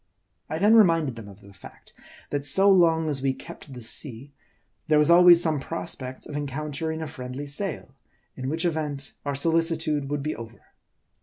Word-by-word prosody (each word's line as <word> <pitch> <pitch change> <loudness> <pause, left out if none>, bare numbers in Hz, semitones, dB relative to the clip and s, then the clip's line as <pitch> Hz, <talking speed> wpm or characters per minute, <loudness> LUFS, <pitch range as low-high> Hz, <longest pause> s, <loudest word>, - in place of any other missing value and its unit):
I 155 - -3
then 205 +6 +4
reminded 165 - +4
them 115 -3 -10
of 100 0 -14
the 100 0 -16
fact, 95 - -15 0.4
that 145 -1 -2
so 190 +8 +4
long 165 -3 +3
as 145 -3 -1
we 135 -1 0
kept 140 - -12
the 125 -2 -9
sea, 130 +3 -2 0.5
there 155 -1 +3
was 150 +2 +4
always 175 0 +8
some 155 -3 0
prospect 130 +4 -5
of - - -9
encount 145 +1 -5
ering 160 0 -3
a - - -5
friendly 130 -1 -7
sail; 150 -1 -4 0.4
in 130 +1 -5
which 165 +4 -2
event, 150 -4 -3
our 140 -1 -2
solicitude 160 -2 0
would 145 -1 -3
be 155 - -3
over. 115 0 -11
145 Hz, 180 wpm, -25 LUFS, 135-165 Hz, 0.5 s, always